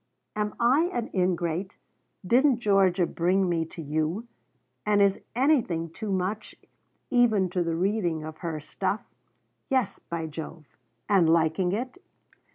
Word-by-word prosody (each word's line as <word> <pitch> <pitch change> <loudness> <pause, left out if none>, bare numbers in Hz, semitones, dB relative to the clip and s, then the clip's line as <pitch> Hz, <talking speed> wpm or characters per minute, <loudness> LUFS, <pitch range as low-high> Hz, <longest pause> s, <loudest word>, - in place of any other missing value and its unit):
Am 210 -1 -2
I 260 +7 +4
an 240 -1 -3
ingrate? 180 0 -1 0.5
Didn't 255 +5 +4
Georgia 195 -5 +3
bring 185 +3 +1
me 165 -2 0
to 165 +1 -9
you? 155 +9 -2 0.6
and 210 -1 +2
is 200 -1 +3
anything 230 - +1
too 210 +4 -5
much, 190 +3 -2 0.6
even 220 -7 +3
to 180 - 0
the 165 -1 -1
reading 175 -3 0
of 155 0 -8
her 165 -3 -3
stuff 190 +7 -3 0.6
yes, 255 -7 0
by 170 -1 -5
Jove, 160 0 -8 0.4
and 190 -5 +4
liking 165 +2 +2
it? 250 - -4
185 Hz, 135 wpm, -27 LUFS, 165-215 Hz, 0.6 s, I